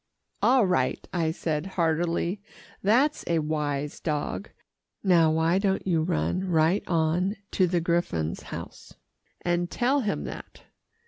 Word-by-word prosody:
"All 255 Hz, -4 st, +5 dB
right," 180 Hz, -1 st, 0 dB
I 165 Hz, -3 st, +1 dB
said 160 Hz, 0 st, -2 dB
heartily. 170 Hz, +3 st, 0 dB, 0.4 s
"That's 255 Hz, +9 st, +3 dB
a 170 Hz, -, +2 dB
wise 150 Hz, -2 st, -2 dB
dog. 145 Hz, -, -3 dB, 0.5 s
Now 170 Hz, -5 st, +5 dB
why 160 Hz, +3 st, +2 dB
don't 195 Hz, -1 st, 0 dB
you 170 Hz, -4 st, +2 dB
run 175 Hz, +2 st, 0 dB
right 165 Hz, +4 st, +3 dB
on 170 Hz, +4 st, +1 dB, 0.2 s
to 185 Hz, -, +3 dB
the 175 Hz, 0 st, +1 dB
griffon's 165 Hz, -, -1 dB
house, -, -, -8 dB, 0.5 s
and 175 Hz, 0 st, 0 dB
tell 255 Hz, +7 st, +1 dB
him 210 Hz, -6 st, -1 dB
that? -, -, -9 dB
170 Hz, 130 wpm, -27 LUFS, 160-190 Hz, 0.5 s, All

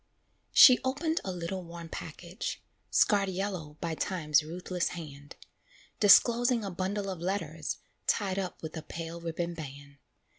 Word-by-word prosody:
She 255 Hz, -2 st, +9 dB
opened 300 Hz, +6 st, 0 dB
a 190 Hz, -, -3 dB
little 180 Hz, +1 st, -4 dB
worn 170 Hz, 0 st, -9 dB
package, 170 Hz, +5 st, -6 dB, 0.3 s
Scarred 200 Hz, -2 st, +3 dB
yellow 185 Hz, -5 st, -4 dB
by 170 Hz, -1 st, -2 dB
Time's 155 Hz, -4 st, +1 dB
ruthless 175 Hz, +3 st, -3 dB
hand; 145 Hz, -3 st, -10 dB, 0.6 s
Disclosing 235 Hz, +3 st, +5 dB
a 195 Hz, -, -4 dB
bundle 195 Hz, +3 st, -2 dB
of 185 Hz, -3 st, -4 dB
letters 165 Hz, -4 st, -3 dB, 0.3 s
Tied 195 Hz, -3 st, +1 dB
up 185 Hz, -3 st, -5 dB
with 160 Hz, +1 st, -6 dB
a 160 Hz, -, -4 dB
pale 165 Hz, +1 st, -7 dB
ribbon 170 Hz, +1 st, -3 dB
band. 140 Hz, -2 st, -9 dB
175 Hz, 140 wpm, -30 LUFS, 160-195 Hz, 0.6 s, She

